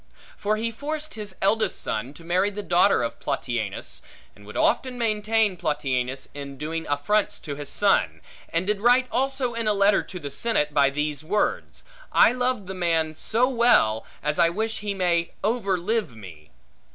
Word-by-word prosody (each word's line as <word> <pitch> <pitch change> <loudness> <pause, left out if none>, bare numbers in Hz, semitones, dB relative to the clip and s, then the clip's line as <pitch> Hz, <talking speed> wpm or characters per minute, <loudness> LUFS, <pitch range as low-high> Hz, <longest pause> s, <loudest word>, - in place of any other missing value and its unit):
For 210 +1 -1
he 230 +1 -2
forced 305 +5 -5
his 210 -4 -7
eldest 210 0 +2
son 125 +7 -3
to 165 - -13
marry 180 +4 +1
the 205 0 -6
daughter 175 -6 +3
of 115 - -4
Plautianus; 120 -7 -3 0.3
and 105 0 -16
would 105 - -7
often 255 -1 +1
maintain 215 -2 +1
Plautianus, 130 -5 -2
in 140 -1 -7
doing 160 +3 -4
affronts 145 +9 +1
to 145 - -5
his 145 0 -6
son; - - +2 0.3
and 165 +2 -1
did 205 0 -1
write 245 +2 +4
also 265 -2 0
in 230 -1 -2
a 210 - +3
letter 200 0 +4
to 180 - -9
the 145 -3 -6
senate, 150 -7 0
by 140 -1 +4
these 150 +1 -2
words: 205 +6 -1 0.3
I - - +6
love 250 -4 -1
the 190 - -6
man 165 -3 0
so 230 +9 +1
well, 235 - +3 0.2
as 150 +1 0
I 165 - +5
wish 220 +5 -2
he 205 -1 -3
may 170 -3 0
over 205 -3 +1
live 195 - -1
me. 85 -8 -12
185 Hz, 175 wpm, -25 LUFS, 145-220 Hz, 0.3 s, I